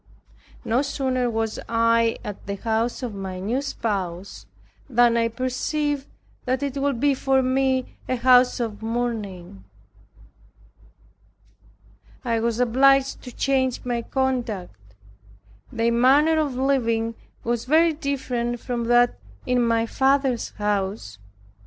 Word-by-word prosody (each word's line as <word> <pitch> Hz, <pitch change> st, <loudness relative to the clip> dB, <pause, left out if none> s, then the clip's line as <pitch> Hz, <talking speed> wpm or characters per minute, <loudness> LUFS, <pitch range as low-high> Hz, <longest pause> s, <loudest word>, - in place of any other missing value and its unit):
No 235 Hz, +3 st, +2 dB
sooner 260 Hz, -3 st, -1 dB
was 225 Hz, -1 st, -2 dB
I 230 Hz, 0 st, +2 dB
at 205 Hz, -2 st, -8 dB
the 200 Hz, -, -2 dB
house 225 Hz, +5 st, -1 dB
of 240 Hz, -4 st, -4 dB
my 190 Hz, -2 st, -6 dB
new 230 Hz, +8 st, -1 dB
spouse, 195 Hz, -9 st, -4 dB, 0.4 s
than 240 Hz, -1 st, +4 dB
I 230 Hz, 0 st, +2 dB
perceived 270 Hz, +4 st, -2 dB, 0.4 s
that 260 Hz, +1 st, -1 dB
it 280 Hz, -1 st, -3 dB
would 275 Hz, -3 st, 0 dB
be 285 Hz, +2 st, +3 dB
for 265 Hz, 0 st, +1 dB
me 260 Hz, 0 st, 0 dB
a 255 Hz, -, +1 dB
house 250 Hz, 0 st, +4 dB
of 225 Hz, -3 st, -4 dB
mourning. 215 Hz, -, -4 dB, 2.6 s
I 230 Hz, -2 st, +1 dB
was 230 Hz, 0 st, -1 dB
obliged 270 Hz, +3 st, +3 dB
to 250 Hz, -, -7 dB
change 260 Hz, -1 st, 0 dB
my 240 Hz, -1 st, -1 dB
conduct. 215 Hz, -, -3 dB, 0.8 s
Their 230 Hz, 0 st, +1 dB
manner 280 Hz, +7 st, +4 dB
of 290 Hz, -4 st, -1 dB
living 230 Hz, -4 st, 0 dB, 0.3 s
was 235 Hz, 0 st, -1 dB
very 320 Hz, +4 st, +4 dB
different 250 Hz, -5 st, -2 dB
from 235 Hz, 0 st, -3 dB
that 240 Hz, +1 st, +3 dB, 0.3 s
in 250 Hz, -1 st, +2 dB
my 230 Hz, -1 st, +2 dB
father's 265 Hz, 0 st, +1 dB
house. 195 Hz, -, -2 dB
240 Hz, 120 wpm, -23 LUFS, 225-265 Hz, 2.6 s, than